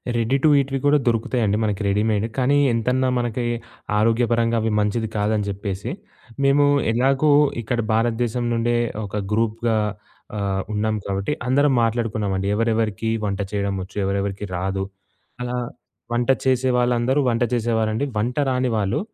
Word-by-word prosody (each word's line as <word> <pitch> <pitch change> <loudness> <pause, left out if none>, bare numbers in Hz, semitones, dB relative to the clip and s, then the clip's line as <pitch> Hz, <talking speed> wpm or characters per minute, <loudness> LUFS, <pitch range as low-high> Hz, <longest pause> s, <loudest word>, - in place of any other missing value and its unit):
Ready 120 +4 +1
to - - +6
ఈట్‌వి 135 0 -1
కూడా 145 +1 +5
దొరుకుతాయండి, 115 -2 +1
మనకి 105 -1 -1
రెడీమేడ్. 105 +1 +1
కానీ, 130 +2 +3 0.2
ఎంతన్నా 125 +3 +1
మనకి 120 0 -1 0.5
ఆరోగ్యపరంగా 115 +1 +2
అవి 110 - 0
మంచిది 105 +2 0
కాదని 105 0 0
జెప్పేసి, 100 -1 -4 0.5
మేము 140 +1 +4 0.3
ఎలాగో 135 +5 +2 0.3
ఇక్కడ 120 +2 -2
భారతదేశం 120 +1 0
నుండే 120 +1 +1 0.3
ఒక 100 - -7 0.2
గ్రూప్‌గా 115 +1 0 0.6
ఆహ్, 100 -1 -1
ఉన్నాం 110 +1 0
కాబట్టి. 100 +6 -2 0.2
అందరం 140 +2 +3
మాట్లాడుకున్నామండి, 110 -4 -1
ఎవరెవరికి 110 -1 0 0.2
వంట 100 -1 -2
చేయడం 100 -1 -1
ఒచ్చు, 95 +2 -12
ఎవరెవరికి 100 +1 -2
రాదు, 95 +2 -2 0.6
అలా 125 0 -2 0.6
వంట 120 +2 0 0.2
చేసే 130 0 +2
వాళ్ళందరూ 125 +2 +2
వంట 115 0 +1
చేసేవారండి. 110 +1 0
వంట 120 +4 -1
రాని 125 0 +1
వాళ్ళు 100 -2 0
115 Hz, 130 wpm, -22 LUFS, 105-125 Hz, 0.6 s, to